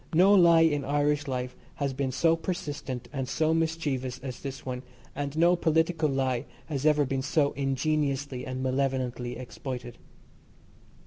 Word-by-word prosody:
No 190 +4 +6
lie 170 -4 +7
in 145 -3 +3
Irish 145 +1 +1
life 125 -1 -3 0.2
has 140 -2 -1
been 135 0 -1
so 165 +5 +3
persistent 145 -7 -4
and 135 -2 -3
so 155 +3 +2
mischievous 150 -6 -1
as 130 -2 -5
this 135 -1 -7
one, 125 -1 -4 0.3
and 145 +1 -3
no 170 +2 +5
political 160 -1 +2
lie 130 -2 0 0.2
has 145 -1 -1
ever 150 -1 +4
been 135 0 -1
so 145 +1 +2
ingeniously, 140 -1 -1
and 130 0 -4
malevolently 130 -2 -1
exploited. 125 -1 -7
140 Hz, 145 wpm, -28 LUFS, 130-155 Hz, 0.3 s, lie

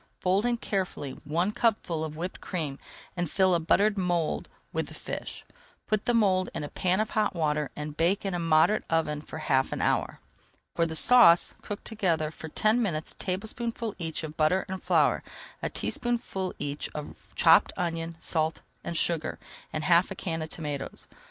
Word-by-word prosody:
Fold 195 +5 +2
in 240 -1 +1
carefully 185 -10 -2
one 170 +7 +1
cupful 210 -8 0
of 155 -1 -5
whipped 175 +4 -5
cream 155 -7 -3 0.4
and 175 -3 -1
fill 190 +1 +3
a 170 - +3
buttered 200 +5 +3
mould 175 -3 0 0.2
with - - -1
the - - -9
fish. - - -6 0.4
Put 215 -2 0
the 240 - +2
mould 190 -4 +3
in - - -3
a 145 - -5
pan 185 +1 +1
of 215 - 0
hot 215 -3 +1
water 150 -3 0
and 150 0 -5
bake 175 +6 +1
in 195 - -1
a 175 - -1
moderate 165 +5 +4
oven 155 -2 0
for 155 - -9
half 135 -4 +1
an - - -3
hour. - - 0 0.5
For 170 - +2
the 160 - -5
sauce, 225 -4 +6
cook 205 - -6
together 170 -8 0
for 160 0 -9
ten 215 +8 +2
minutes 160 -8 -2
a - - -16
tablespoonful 220 +4 -3
each 160 -1 -4
of 155 0 -6
butter 160 +5 +3
and 190 -1 -5
flour, - - +3 0.4
a - - -1
teaspoonful 230 -6 -2
each 145 0 -3
of 150 -1 -8
chopped - - +6
onion, 165 -1 -2
salt, 160 -1 -1 0.2
and 170 - -3
sugar, 165 -1 0 0.3
and 155 - -3
half 170 +2 +4
a - - -5
can 165 -3 -3
of 155 - -4
tomatoes. 150 -4 -5
170 Hz, 185 wpm, -28 LUFS, 155-200 Hz, 0.5 s, sauce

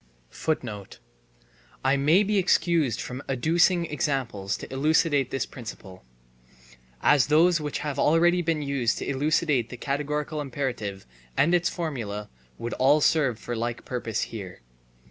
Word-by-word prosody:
* - - -8
I 135 +1 +4
may 155 +8 +4
be 205 0 +1
excused 170 - +2
from 125 +2 -5
adducing 170 +6 +2
examples 125 -10 -2
to - - -9
elucidate 145 -1 +2
this 135 - -2
principle, 100 - -10 1.0
as 145 -4 +5
those 165 +3 +4
which 150 -1 -3
have 145 -2 -3
already 175 +3 +4
been 160 -3 -1
used 135 -5 0
to - - -5
elucidate 140 -3 +1
the 125 - -8
categorical 150 +3 -2
imperative 120 -8 -4 0.3
and 170 +4 +3
its 175 0 +3
formula 115 - -4 0.3
would 120 - -4
all 140 +4 +4
serve 140 -6 +2
for 120 - -6
the 115 - -3
like 120 +1 -3
purpose 115 -4 -3
here. 95 - -7
135 Hz, 140 wpm, -26 LUFS, 115-155 Hz, 1.0 s, as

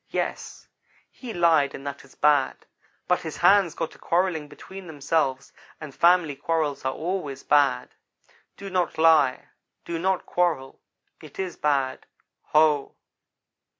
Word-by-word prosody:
Yes - - -4 0.4
he 250 -3 -9
lied 165 -6 +2
and 135 - -10
that 140 0 -6
is - - -19
bad, 145 -2 +2 0.4
but - - +2
his - - -6
hands 195 -5 +4
got 165 - -3
to - - -17
quarrelling 170 -3 0
between 185 +6 -11
themselves, 145 -3 -1 0.3
and 155 -3 -9
family 170 -3 +3
quarrels 150 0 -2
are 130 - 0
always 155 -6 -4
bad. 145 - +2 0.6
Do 195 -1 -8
not 180 -3 -1
lie; 155 -5 +3 0.4
do 170 -1 -4
not 190 +1 0
quarrel. 165 -7 -1 0.4
It 155 -3 -14
is 185 -3 -4
bad. 140 -3 -1 0.4
Ho!" 150 -2 +2
160 Hz, 135 wpm, -25 LUFS, 140-175 Hz, 0.6 s, hands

